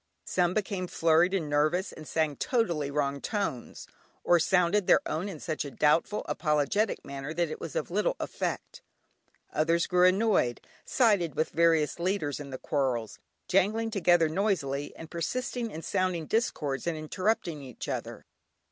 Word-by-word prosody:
Some 180 -1 +1
became 195 -3 -2
flurried 165 +2 +3
and 165 -6 -1
nervous, 155 +6 +1
and 155 -1 -11
sang 155 -3 0
totally 170 - 0
wrong 140 -1 -1
tones, 195 - -3 0.4
or 175 - +4
sounded 180 +4 +2
their - - +6
own 165 +6 -2
in 170 -6 -7
such 155 -1 -3
a 145 - -6
doubtful, 155 +9 +1
apologetic 150 +7 0
manner 140 +3 -6
that 170 -2 0
it - - -7
was - - -6
of - - -2
very - - -3
little - - +1
effect. - - -4 0.7
Others 165 +2 +2
grew 180 0 +4
annoyed, 185 - +2 0.3
sided 205 - +2
with 155 - 0
various 165 -2 +2
leaders 170 -6 -1
in 145 -1 -7
the 130 - -5
quarrels, 130 -6 -2 0.3
jangling 215 +4 +2
together 175 -5 +4
noisily, 155 -6 -1
and 165 0 -10
persisting 240 +7 -3
in 165 -5 -8
sounding 185 -3 -1
discords 150 - -1
and 165 -2 -1
interrupting 170 0 -1
each 130 -4 -8
other. - - -5
170 Hz, 155 wpm, -29 LUFS, 150-195 Hz, 0.7 s, their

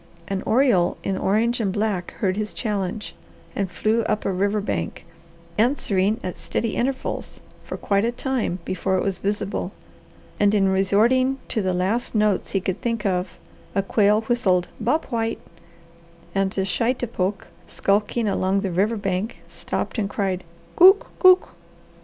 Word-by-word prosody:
An 195 -1 -2
oriole 230 -8 +3
in 195 - -1
orange 225 +6 +1
and 205 -4 0
black 205 -3 -2
heard 190 -5 -1
his 210 0 -4
challenge, 210 -1 -3 0.4
and 195 -2 -1
flew 220 +4 +1
up 215 -1 0
the - - -1
river 200 +3 +1
bank, 205 - -3 0.5
answering 215 -4 +2
at 180 - -5
steady 230 -2 -2
intervals 260 +2 -2 0.2
for - - -6
quite 200 0 +1
a 235 - +1
time 245 -7 -1
before 190 +1 0
it - - 0
was 195 -2 -2
visible, 200 - -2 0.7
and 205 0 +4
in 195 -2 +3
resorting 225 +8 +3
to 220 - 0
the 185 -1 0
last 200 +7 -1
notes 210 -2 +2
he 195 - +2
could 190 +1 -3
think 230 -3 -2
of 180 -1 -1 0.4
a 195 - +2
quail 210 +1 +3
whistled 220 -6 +1
"Bob 250 +8 +1
White" 225 -1 -1 1.0
and 195 -1 +1
a 190 - +1
shitepoke, 210 -1 -1 0.2
skulking 210 +3 0
along 195 0 +1
the 195 -2 -2
river 205 +6 +1
bank, 195 +2 -3
stopped - - -4
and 200 -2 -1
cried, 190 -3 -2 0.4
"Cowk, 385 +3 +8
cowk!" 370 -1 +6
205 Hz, 155 wpm, -23 LUFS, 190-230 Hz, 1.0 s, Cowk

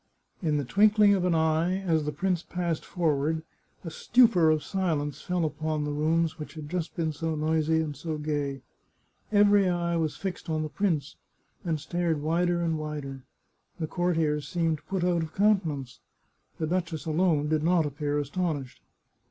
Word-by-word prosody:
In 155 -4 +1
the 145 - -1
twinkling 205 - +5
of 185 -2 +1
an 175 -2 +2
eye, 160 +3 +2
as 160 -5 +1
the 150 - -1
prince 180 0 -1
passed 175 -3 -3
forward, 160 -2 0 0.4
a 165 - -5
stupor 210 -3 +4
of 155 -1 +2
silence 150 -7 -2
fell 180 -2 -1
upon 155 0 -2
the 150 - -2
rooms 160 +2 0
which 150 - -8
had 150 -2 -7
just 180 -2 -3
been 160 -2 -1
so 160 +1 -2
noisy 160 +1 +1
and 150 -2 -4
so 160 0 -4
gay. 145 -3 -3 0.7
Every 205 -2 +5
eye 170 -1 0
was 160 -2 -1
fixed 185 -3 -5
on 155 -1 0
the 155 - -4
prince, 155 -7 -1 0.5
and 165 -3 -1
stared 165 +1 -1
wider 170 +3 +1
and 165 -2 0
wider. 145 -3 -5 0.6
The 160 - -1
courtiers 160 -3 0
seemed 165 -3 -1
put 190 -2 -1
out 175 -1 +2
of 160 0 -6
countenance; 160 - +1 0.6
the 160 - -1
duchess 170 -2 -2
alone 160 -2 +2
did 155 0 +1
not 170 0 +3
appear 145 0 -2
astonished. 145 -2 -3
160 Hz, 170 wpm, -27 LUFS, 150-175 Hz, 0.7 s, twinkling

